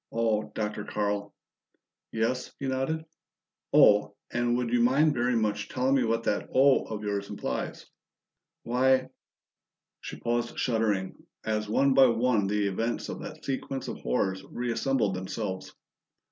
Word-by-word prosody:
"Oh, 110 -2 0
Dr. 105 -1 -2
Carl!" 105 -1 -2 0.8
"Yes," 115 +3 -1
he 140 - -5
nodded. 135 +5 -1 0.7
"'Oh!' 105 0 +5 0.2
and 120 0 +1
would 120 -1 -2
you 120 - +4
mind 140 +6 +4
very 120 -1 +1
much 105 -2 -1
telling 130 +1 +1
me 135 -2 +3
what 115 0 0
that - - -1
'Oh' 135 +1 +4
of 105 -1 -6
yours 100 -1 -2
implies?" - - -4 0.8
"Why 130 +2 +2 0.4
". - - -63
She - - -7
paused 120 0 -1
shuddering, 110 -6 0 0.2
as 105 -1 -1
one 135 +5 +3
by 135 0 +7
one 115 -3 +2
the 105 0 0
events 115 +4 -2
of - - -5
that - - -9
sequence 135 0 -3
of - - -5
horrors 95 +10 -1
reassembled 120 -2 -1
themselves. 95 +1 -4
115 Hz, 145 wpm, -28 LUFS, 105-130 Hz, 0.8 s, by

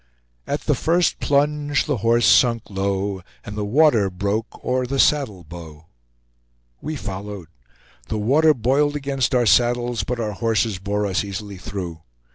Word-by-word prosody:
At - - -2
the - - +1
first 170 +1 +1
plunge 145 +1 +1
the 145 -4 -1
horse 115 +2 +2
sunk 115 -4 +3
low, 95 0 -2 0.2
And 105 - -7
the 105 - -2
water 115 -3 +3
broke 100 +5 -4
o'er 125 0 0
the 135 +2 -2
saddle 130 - +2
bow 80 -1 -11 1.0
We 155 +2 -4
followed; 100 - -7 0.6
the 110 - -3
water 145 +9 +3
boiled 140 +5 +1
against 135 -2 -1
our 120 -1 +3
saddles, 120 +3 +2
but 125 -1 -3
our 110 -2 -2
horses 110 -2 0
bore 105 +2 -1
us 95 0 0
easily 100 0 -6
through. 90 -5 -6
115 Hz, 150 wpm, -22 LUFS, 100-135 Hz, 1.0 s, sunk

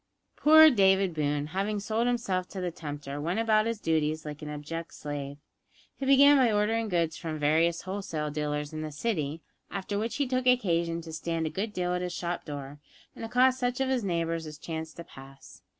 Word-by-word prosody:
Poor 315 +1 +8
David 190 -4 +3
Boone, 145 -1 -1
having 205 +2 -1
sold 220 +3 -1
himself 230 -7 -1
to 190 - -7
the 180 -1 -2
tempter, 145 -3 -6
went 175 +7 -1
about 220 -1 +3
his 230 -2 -2
duties 155 -3 0
like 150 -1 -7
an 150 - -6
abject 150 +3 -6
slave. 145 -1 -5 0.6
He 270 - -4
began 280 +1 +7
by 250 -4 +4
ordering 215 +2 +1
goods 170 -3 0
from 160 -2 -4
various 160 +3 +2
wholesale 185 -6 -4
dealers 150 0 -3
in 155 - -4
the 155 0 -5
city, 155 -3 -2 0.3
after 200 +1 -3
which 225 +4 -2
he 285 0 +1
took 255 0 -1
occasion 170 -9 +2
to 160 -1 -9
stand 165 0 -2
a 155 - -2
good 205 +6 -3
deal 180 -2 -1
at 180 - -1
his 180 -1 -3
shop 175 0 -4
door 145 -1 -7 0.4
and - - -8
accost 255 +3 +3
such 245 0 -1
of 265 -1 +1
his 255 -3 0
neighbours 165 -3 -1
as 155 -1 -9
chanced 160 0 -6
to 170 - -8
pass. 135 - -14
170 Hz, 200 wpm, -28 LUFS, 155-220 Hz, 0.6 s, Poor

